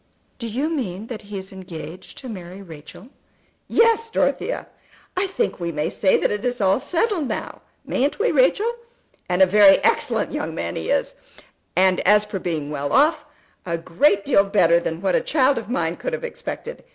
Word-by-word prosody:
"Do 235 - -4
you 255 +7 -1
mean 215 - -3
that 235 -3 -6
he 205 -1 -8
is 190 0 -8
engaged 185 -2 -9
to 265 - -8
marry 185 -4 -8
Rachel?" 165 - -12 0.6
"Yes, 455 0 +3
Dorothea. - - -1 0.5
I 375 +2 +1
think 385 - -2
we 170 -1 -2
may 150 -1 -2
say 190 - +3
that - - 0
it 210 0 -3
is 245 0 -1
all 195 +2 +3
settled 350 - 0
now; - - -5 0.2
mayn't 280 +3 0
we, 465 +3 +1
Rachel? 470 -2 +3 0.6
And 180 +1 +4
a - - +8
very 195 +1 +7
excellent - - +1
young - - -4
man 85 0 -3
he 80 - -4
is, - - 0 0.6
and 185 +1 +4
as 210 +2 +4
for 205 -2 -5
being 155 -5 -3
well 145 -1 -3
off, 300 +2 +3 0.4
a 170 -2 -2
great 195 +4 +2
deal 220 -8 +4
better 185 -4 +3
than 165 0 -4
what 190 -2 +1
a - - +3
child 275 -3 +2
of 220 -2 -10
mine 170 -8 -1
could - - -4
have 485 - -3
expected. 485 0 -6
200 Hz, 190 wpm, -22 LUFS, 175-285 Hz, 0.6 s, a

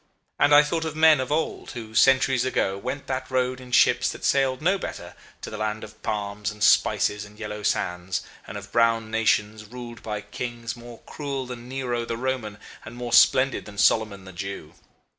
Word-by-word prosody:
And 145 - +4
I 145 - +8
thought 160 +2 -2
of 160 -1 -4
men 155 -2 +6
of 130 +1 -3
old 155 +1 -2
who, 110 -3 -8
centuries 130 0 +4
ago, 115 -6 0
went 130 +8 -5
that 130 0 -4
road 130 0 0
in 125 -1 -12
ships - - +4
that - - -6
sailed 135 -2 +2
no 185 +5 +1
better, - - -7 0.3
to - - -7
the 110 - -6
land 110 0 -2
of 110 0 -12
palms, 105 -1 -3
and 105 -1 -5
spices, 105 0 +3
and 105 0 -14
yellow 105 -1 -6
sands, 90 -2 -1 0.2
and 95 - -6
of 100 0 -10
brown 115 -1 +2
nations 110 -1 +1
ruled 120 +1 -9
by 105 -1 -4
kings 120 +1 -6
more 120 -1 -12
cruel 140 -3 -4
than 125 -1 -9
Nero 125 -3 -2
the 115 0 -4
Roman 120 -4 -3 0.3
and 110 - -10
more 120 -1 -5
splendid 130 +3 +5
than 105 -1 -11
Solomon 105 -2 +2
the 95 - -11
Jew. 95 -4 -6
115 Hz, 195 wpm, -25 LUFS, 105-130 Hz, 0.3 s, I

